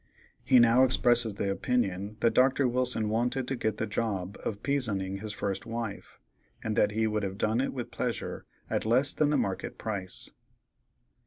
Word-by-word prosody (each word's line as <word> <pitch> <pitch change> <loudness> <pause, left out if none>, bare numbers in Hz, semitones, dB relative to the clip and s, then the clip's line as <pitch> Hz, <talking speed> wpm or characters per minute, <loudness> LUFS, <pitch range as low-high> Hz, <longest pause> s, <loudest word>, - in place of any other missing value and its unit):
He 130 - +5
now 120 +1 +6
expresses 120 -4 +2
the 100 0 -1
opinion 100 -2 -1
that 115 -1 +3
Dr. 130 +2 +4
Wilson 125 -3 +1
wanted 120 +4 0
to 135 - -1
get 110 -3 -1
the 110 - -1
job 100 -3 -2
of 100 -2 -4
"pizoning" 100 -9 0
that 110 -1 -4
first 100 -2 -3
wife, 115 -3 -5 0.4
and 110 -1 -1
that 105 0 +3
he 110 +1 +1
would 105 -1 0
have 95 -1 -3
done 110 +4 +1
it 135 - -1
with 125 -3 -5
pleasure 125 -2 -3 0.2
at - - -1
less 130 +6 +2
than 150 -1 +2
the 150 - +2
market 95 -1 -2
price. 100 -5 -4
110 Hz, 175 wpm, -29 LUFS, 100-125 Hz, 0.4 s, now